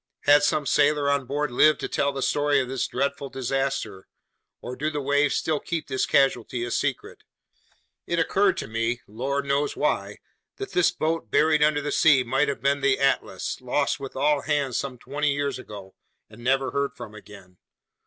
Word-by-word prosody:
Had 145 0 +5
some 145 0 +1
sailor 145 0 +2
on 140 -3 -1
board 145 0 -2
lived 150 +4 +4
to - - -2
tell 140 - 0
the 135 -1 -4
story 145 -1 +2
of 130 - -1
this 130 0 -2
dreadful 140 0 -2
disaster, 135 -7 -3 0.5
or 125 - -7
do 150 +4 -2
the 150 -1 -3
waves 145 +1 +1
still 155 -2 0
keep 170 -2 -4
this 130 -1 -1
casualty 125 -3 +1
a 120 - -6
secret? - - -2 0.9
It 170 - -1
occurred 195 +4 +2
to - - -4
me, 115 +2 -2
lord 135 +6 -3
knows 140 +1 0
why, - - -1 0.4
that 400 -1 -7
this 180 - +3
boat 160 -7 -2
buried 155 +5 +3
under 150 -1 +3
the 145 - -2
sea 140 -4 +4
might 135 +4 +1
have 140 - -3
been 140 +1 +1
the 135 -1 +2
Atlas, 130 -7 -1
lost 135 +3 0
with 135 -1 -8
all 145 +1 +2
hands 145 -5 -1
some 135 -1 -3
twenty 145 +4 -2
years 140 -2 -2
ago 100 -6 -10 0.4
and 115 +2 -13
never 135 +1 +1
heard 140 0 -2
from 105 - -9
again! 100 -3 -14
140 Hz, 185 wpm, -25 LUFS, 125-145 Hz, 0.9 s, Had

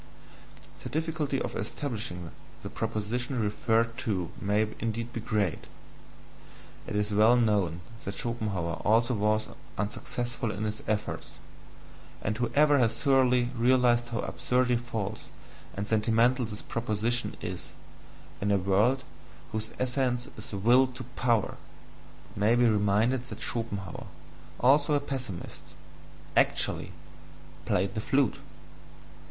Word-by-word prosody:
The - - -6
difficulty 155 -3 -1
of - - -3
establishing 105 - -4 0.3
the - - -6
proposition 115 +4 -2
referred 115 +2 +1
to 100 -9 -2
may 105 +2 +2
indeed 115 +1 -3
be - - -3
great 105 -7 -1 1.2
it - - -4
is 105 0 0
well 110 +4 +6
known 100 -8 +2 0.2
that 95 - -4
Schopenhauer 100 -8 -2
also 115 +3 +3
was 110 0 +1 0.3
unsuccessful 120 +3 -3
in 105 0 -3
his 110 0 -3
efforts; 110 0 -2 0.9
and 105 - 0
whoever 145 +5 +3
has 115 -3 +2
thoroughly 125 -3 +3
realized 120 0 +4
how 115 -2 -2
absurdly 125 0 +1
false 110 -3 -4 0.5
and 100 - -1
sentimental 115 +3 +3
this 105 -1 -7
proposition 115 +1 -1
is, 90 -1 -6 0.7
in 100 - +1
a 100 - +4
world 100 +8 +2 0.5
whose 110 0 -3
essence 125 -1 +1
is 105 - -6
Will 120 +6 +4
to 130 0 -8
Power, 115 -5 +1 0.8
may 105 +4 +3
be 120 0 +4
reminded 110 +4 +2
that 135 - -8
Schopenhauer, 100 -6 -4 0.5
although 145 +4 +4
a - - +3
pessimist, 130 -10 -5 0.7
ACTUALLY - - +1 0.7
played 95 +2 +1
the 110 - -2
flute... 140 +2 +2
115 Hz, 120 wpm, -29 LUFS, 105-125 Hz, 1.2 s, well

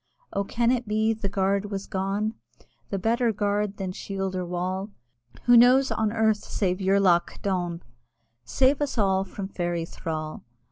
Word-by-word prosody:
Oh! 200 - 0
can 235 +4 +1
it 245 -2 -1
be 215 +1 +2
the 215 -3 -3
guard 200 +1 0
was 200 -1 -4
gone, 195 +3 -1 0.6
The 200 - -2
better 230 +4 +1
guard 205 -1 -1
than 190 -2 -3
shield 195 0 -4
or 185 - -1
wall? 185 +3 -3 0.5
Who 245 - +6
knows 250 +3 +6
on 220 -1 0
earth 220 -1 +1
save 185 -2 -1
Jurlagh 190 -3 +2
Daune? 175 -3 -1 0.6
(Save 265 - +2
us 285 -3 -2
all 190 -3 +2
from 195 +1 -6
Fairy 175 -3 -2
thrall!) 155 -2 -5
200 Hz, 155 wpm, -26 LUFS, 185-220 Hz, 0.6 s, Who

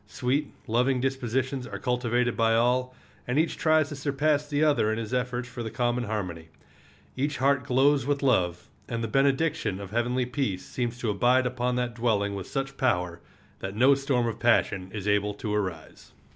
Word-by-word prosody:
Sweet, 130 +8 -1
loving 125 +3 +1
dispositions 130 0 -1
are 100 - -6
cultivated 120 +1 0
by 115 0 +3
all, 125 +2 +1 0.3
and 125 +3 0
each 160 +2 +2
tries 155 -2 +3
to 150 - -6
surpass 145 +1 0
the 145 +1 +1
other 145 -8 +3
in 110 - -1
his 115 +1 -5
efforts 125 -1 -1
for 125 0 -7
the 110 - -4
common 120 0 -1
harmony. 90 -7 -4 0.7
Each 145 +2 -1
heart 135 -1 +2
glows 140 +1 +3
with 140 +2 -1
love, 90 -10 +1 0.2
and 115 0 -2
the - - -1
benediction 135 - +1
of 100 -1 -8
heavenly 120 +2 0
peace 120 -8 -2
seems 120 -1 -3
to 115 - 0
abide 125 +5 +3
upon 125 0 -1
that 125 -1 -1
dwelling 110 -4 0
with 95 -2 -5
such 135 0 -4
power 90 -10 0 0.4
that 95 +1 -5
no 130 +5 +6
storm 135 -3 0
of 115 -2 -3
passion 100 -5 +2
is 105 0 -5
able 105 0 +1
to 105 0 -3
rise. 90 -6 -5
125 Hz, 185 wpm, -27 LUFS, 110-135 Hz, 0.7 s, no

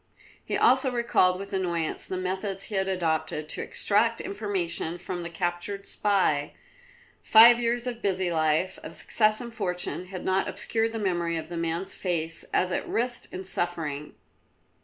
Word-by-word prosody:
He - - -2
also 265 - +4
recalled 235 -7 +2
with 200 +1 -8
annoyance 170 -4 -1
the 185 - -3
methods 190 +1 -3
he 215 - -8
had 190 0 +1
adopted 160 -4 -1
to - - 0
extract 230 +3 +1
information 190 -5 -2
from 180 0 -5
the 170 - -5
captured 175 +3 -3
spy; 185 -8 +1 0.7
five 235 +2 +8
years 240 0 0
of 240 -2 -4
busy 190 -2 0
life, 155 +3 +1
of - - -8
success 215 -1 +2
and 235 -1 -7
fortune, 180 -4 -2
had 185 -1 -7
not 190 +1 +1
obscured 225 0 -1
the - - -3
memory 175 -5 0
of 160 - -6
the 175 - -5
man's 165 +3 -2
face 165 -3 -2
as 185 0 +1
it - - -1
writhed 245 +1 -2
in 185 - -6
suffering. 165 -6 -2
185 Hz, 160 wpm, -27 LUFS, 170-210 Hz, 0.7 s, five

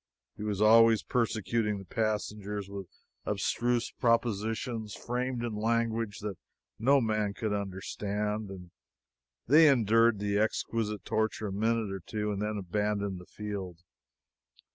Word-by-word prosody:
He - - -10
was 105 -1 0
always 115 0 +6
persecuting 110 -2 0
the 95 - -9
passengers 105 0 -2
with 100 -2 -7 0.4
abstruse 120 0 0
propositions 115 -1 0
framed 125 0 -2
in 120 -2 -2
language 115 0 0
that 105 -2 -5 0.4
no 135 +5 +5
man 110 -4 0
could 110 -2 -2
understand, 105 +1 -3
and 90 -3 -10 0.7
they 155 +5 +7
endured 115 -3 +4
the 100 0 0
exquisite 110 -1 -1
torture 110 -1 -1
a - - -5
minute 110 0 0
or 95 - -4
two 105 +3 -3
and 100 0 -3
then 105 0 -1
abandoned 100 0 -1
the 90 - -13
field. 95 -5 -6
105 Hz, 130 wpm, -30 LUFS, 100-115 Hz, 0.7 s, they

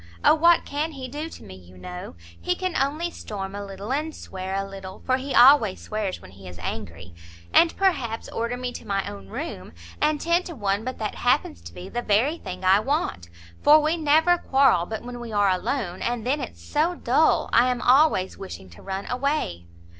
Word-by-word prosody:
O - - +8
what 335 +2 +4
can 305 +3 -3
he 265 -2 -6
do 300 +5 -5
to - - -12
me, 95 - -11
you 90 0 -15
know? 90 -1 -8 0.3
he 360 - 0
can 370 -1 -3
only 305 +6 0
storm 195 -8 -6
a 205 0 -5
little, 200 +4 -5
and 310 +2 -2
swear 190 0 -6
a 195 0 -2
little, 195 -1 -10
for 255 0 +2
he 270 +1 -4
always 240 -7 +6
swears 215 -3 -3
when - - -14
he 95 0 -13
is 90 -1 -10
angry; 85 -1 -6 0.4
and 335 -1 +5
perhaps 260 - 0
order 235 +2 -3
me 250 0 -4
to 235 - -9
my 195 -1 -1
own 100 -1 -8
room; 90 -2 -6 0.3
and 300 0 +2
ten 340 +3 +2
to 345 -2 -8
one 200 -2 -1
but 255 +2 -5
that 215 -2 -3
happens 170 - 0
to 85 0 -10
be 90 +1 -9
the 240 - -3
very 245 +10 +1
thing 185 +1 -7
I 190 +2 +6
want; 255 - -2 0.3
for 300 +1 +7
we 310 +2 +1
never 320 +2 +3
quarrel 265 -11 +3
but 220 +1 -5
when 245 0 -7
we 240 -1 -7
are 205 -1 +3
alone, 185 0 -2
and 240 -2 -2
then 280 +4 0
it's 250 - -8
so 320 +4 0
dull, - - +2
I 245 +2 +5
am 250 -1 -1
always 250 -9 +3
wishing 95 - -9
to 85 - -14
run 195 0 -5
away." 250 - -2
235 Hz, 210 wpm, -24 LUFS, 185-290 Hz, 0.4 s, O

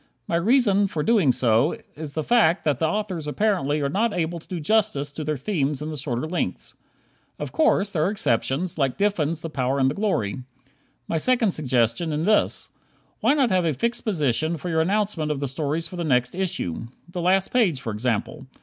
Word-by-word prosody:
My 170 - 0
reason 205 +1 +3
for 155 -5 -3
so - - -6
doing 210 - +4 0.7
is 150 -1 -7
the 155 - -1
fact 205 -6 +3
that 145 -5 0
the 160 - +2
authors 185 -4 -3
apparently 155 -4 0
are 140 - +1
not 210 +9 0
able 170 0 -1
to - - -19
do 180 -3 -4
justice 160 -5 +1
to 155 +2 -6
their 150 0 -2
themes 145 -2 -1
in 155 +1 -4
the - - -5
shorter 130 -1 -3
lengths. 175 +2 -3 0.6
Of - - -5
course, 210 -11 +2
there 155 -5 +1
are - - +2
exceptions, 160 - -1
like 135 -3 0
Diffin's 170 -6 0
"The 165 - -5
Power 130 -1 0
and 135 -1 +3
the - - -3
Glory." 140 - -1 0.7
My 165 - 0
second 240 -1 +3
suggestion 130 +1 0
in 155 +2 -1
this: 210 +1 +2 0.5
Why 280 - +3
not 265 -7 +2
have 185 -1 +3
a 160 -4 0
fixed 235 - -1
position 155 - 0
for 165 +4 -5
your 160 -1 +2
announcement 195 -3 0
of 150 -2 -1
the 140 - -2
stories 150 +4 -2
for 180 - -9
the 175 - -2
next 125 -5 +1
issue? 180 - -3 0.2
The 175 - -4
last 185 +2 +2
page, 200 - +3
for 115 - -4
example. 125 +5 -2
160 Hz, 205 wpm, -24 LUFS, 140-195 Hz, 0.7 s, doing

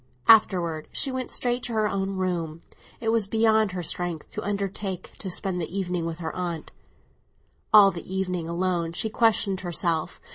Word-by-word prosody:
Afterwards 175 -8 +4
she 275 - +2
went 260 -1 -3
straight 245 0 +1
to 245 -1 -4
her 215 -1 +2
own 195 -1 -2
room; 170 -4 -2 0.4
it 225 - -1
was 225 -3 +3
beyond 220 -2 +3
her 180 -1 -3
strength 170 -1 -3
to 215 - -4
undertake 200 -2 -4
to 195 - -4
spend 180 0 -1
the 170 +4 -4
evening 180 -3 -2
with 165 -1 -4
her 165 -2 -5
aunt. 170 -3 -4 1.0
All 205 -2 +8
the 175 0 -9
evening, 180 -3 -2
alone, 170 -1 -1
she 220 +5 -2
questioned 210 -4 +2
herself. 170 -2 -1
185 Hz, 170 wpm, -25 LUFS, 170-215 Hz, 1.0 s, All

